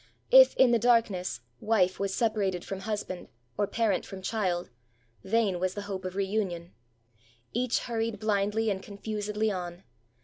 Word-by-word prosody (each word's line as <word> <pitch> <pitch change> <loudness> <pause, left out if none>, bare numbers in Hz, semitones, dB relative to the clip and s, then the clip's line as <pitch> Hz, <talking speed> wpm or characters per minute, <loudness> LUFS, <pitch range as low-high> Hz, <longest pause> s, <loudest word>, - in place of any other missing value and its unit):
If, - - +8
in 255 -2 +5
the 235 - +4
darkness, 205 - +2 0.2
wife 190 -4 +2
was 200 0 -1
separated 195 -4 0
from 195 - -5
hus 210 +1 -2
band, 185 -1 -7 0.3
or 205 - 0
parent 215 -5 +1
from 190 -1 -9
child, 185 - -1 0.5
vain 200 -2 +1
was 185 +1 -1
the 205 - -4
hope 195 -2 -5
of 185 0 -4
reun 200 +1 0
ion. 170 0 -8 0.8
Each 245 +1 +1
hurried 230 -2 -2
blindly 210 +1 +1
and 190 -1 -3
confusedly 210 +1 -2
on. 180 -1 -5
205 Hz, 160 wpm, -29 LUFS, 185-220 Hz, 0.8 s, If